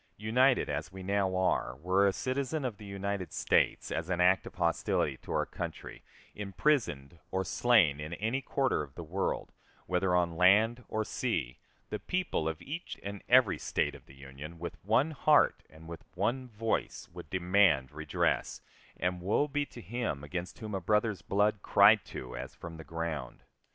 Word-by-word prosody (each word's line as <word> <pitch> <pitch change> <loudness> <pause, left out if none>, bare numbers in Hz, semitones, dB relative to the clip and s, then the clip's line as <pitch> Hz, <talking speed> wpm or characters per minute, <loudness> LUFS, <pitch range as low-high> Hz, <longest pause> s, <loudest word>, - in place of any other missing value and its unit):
United 125 +5 +3
as 75 +4 -3
we 95 0 -9
now 95 -1 0
are, 90 -8 +1
were 95 +7 +2
a - - +4
citizen 135 +6 -2
of 115 -5 -3
the 105 - -11
United 100 -1 -4
States, - - +1
as 80 +2 -3
an 90 -1 0
act 90 +2 +4
of - - -11
hostility 85 -2 +1
to - - -10
our - - +1
country, - - -7 0.3
imprisoned 100 - -1
or 95 0 -1
slain 95 -10 +4
in 75 +3 -5
any 115 +8 -1
quarter 135 - 0
of 70 -3 -9
the 85 - -6
world, 90 +5 -2 0.3
whether 90 0 +1
on 85 -2 +1
land 110 +7 +4
or 110 - -1
sea, 80 - -2 0.3
the 105 - -2
people 180 - -1
of 80 -1 -5
each 160 +5 -6
and 100 0 -6
every 125 -4 +5
State - - 0
of - - -14
the 65 - -15
Union, 70 +4 -10
with 85 +1 -7
one 115 - +2
heart 150 0 +4
and 80 +1 -14
with 85 0 -8
one 130 +2 -1
voice, 115 -1 -2
would 85 -4 -10
demand 90 -7 +3
redress, - - -1 0.4
and 90 0 -1
woe 105 +10 +1
be 145 0 -1
to 120 - -11
him 105 - -3
against 85 +4 -5
whom 110 -2 -7
a 95 - -2
brother's 105 -1 +1
blood 105 +5 +1
cried 105 +2 +6
to - - -7
as - - -7
from 85 -1 -9
the 80 - -9
ground! 80 +1 -5
95 Hz, 175 wpm, -31 LUFS, 85-115 Hz, 0.4 s, cried